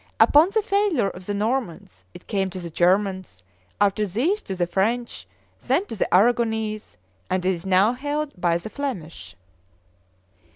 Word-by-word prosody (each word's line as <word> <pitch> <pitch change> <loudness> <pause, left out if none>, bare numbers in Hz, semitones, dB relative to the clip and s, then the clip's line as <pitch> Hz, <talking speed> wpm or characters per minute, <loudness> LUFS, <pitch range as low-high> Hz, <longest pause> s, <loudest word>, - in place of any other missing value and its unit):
Upon 305 +5 +6
the 435 0 +1
failure 395 - +1
of 180 0 -12
the 205 - -2
Normans, 200 - -3
it - - -12
came 195 -3 -1
to 185 - -7
the 170 -2 -7
Germans, 185 - 0 0.4
after 205 +1 +2
these 280 - 0
to 190 - -6
the 175 -1 0
French, 225 +7 -2 0.4
then 280 +10 +2
to 225 - -7
the 195 - 0
Aragonese, 220 +1 +1 0.3
and 185 -1 -1
it - - +3
is 180 +1 -5
now 190 +5 +4
held 290 +3 -3
by 175 -2 +1
the 195 +6 -9
Flemish. 165 - -6
205 Hz, 160 wpm, -23 LUFS, 185-250 Hz, 0.4 s, Upon